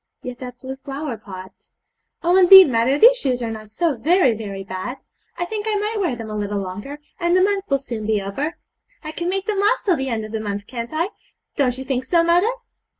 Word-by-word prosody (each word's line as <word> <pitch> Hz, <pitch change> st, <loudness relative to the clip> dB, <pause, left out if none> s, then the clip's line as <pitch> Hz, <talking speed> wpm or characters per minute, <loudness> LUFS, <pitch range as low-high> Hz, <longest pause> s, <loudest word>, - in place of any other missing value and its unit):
Yet, 250 Hz, -1 st, -7 dB
that 250 Hz, -1 st, -8 dB
blue 265 Hz, 0 st, -7 dB
flower 275 Hz, -1 st, -5 dB
pot. 190 Hz, -3 st, -10 dB, 0.7 s
Oh, 350 Hz, +2 st, +3 dB
indeed, 375 Hz, -3 st, +9 dB
mother, 235 Hz, +4 st, +2 dB
these -, -, +7 dB
shoes 255 Hz, -, -1 dB
are 225 Hz, -, -3 dB
not 215 Hz, -1 st, -8 dB
so 300 Hz, +7 st, 0 dB
very 320 Hz, 0 st, +3 dB
very 200 Hz, -3 st, -6 dB
bad! 190 Hz, +7 st, -5 dB, 0.4 s
I 350 Hz, -, -1 dB
think 425 Hz, +3 st, -4 dB
I 430 Hz, -, +1 dB
might 420 Hz, +1 st, -2 dB
wear 345 Hz, -10 st, 0 dB
them 225 Hz, -2 st, -7 dB
a -, -, -4 dB
little 205 Hz, -1 st, -2 dB
longer, 200 Hz, +9 st, -6 dB, 0.2 s
and 345 Hz, 0 st, +2 dB
the 370 Hz, -, +4 dB
month 400 Hz, 0 st, 0 dB
will 275 Hz, -, +3 dB
soon 235 Hz, -5 st, -6 dB
be 220 Hz, -1 st, +2 dB
over. 275 Hz, -, -4 dB, 0.5 s
I 310 Hz, -, -5 dB
can 340 Hz, +2 st, -3 dB
make 385 Hz, +1 st, -2 dB
them 415 Hz, -1 st, -1 dB
last 415 Hz, +5 st, +2 dB
till 375 Hz, -4 st, +3 dB
the 265 Hz, 0 st, -3 dB
end 220 Hz, -3 st, -2 dB
of 215 Hz, -, -10 dB
the 220 Hz, -, -3 dB
month, 205 Hz, -1 st, -4 dB
can't 235 Hz, 0 st, -6 dB
I? 330 Hz, +4 st, -1 dB, 0.5 s
Don't 255 Hz, -4 st, +1 dB
you 265 Hz, -, -5 dB
think 260 Hz, -1 st, -2 dB
so, 335 Hz, +4 st, +3 dB
mother?' 350 Hz, +5 st, +3 dB
265 Hz, 230 wpm, -21 LUFS, 220-350 Hz, 0.7 s, indeed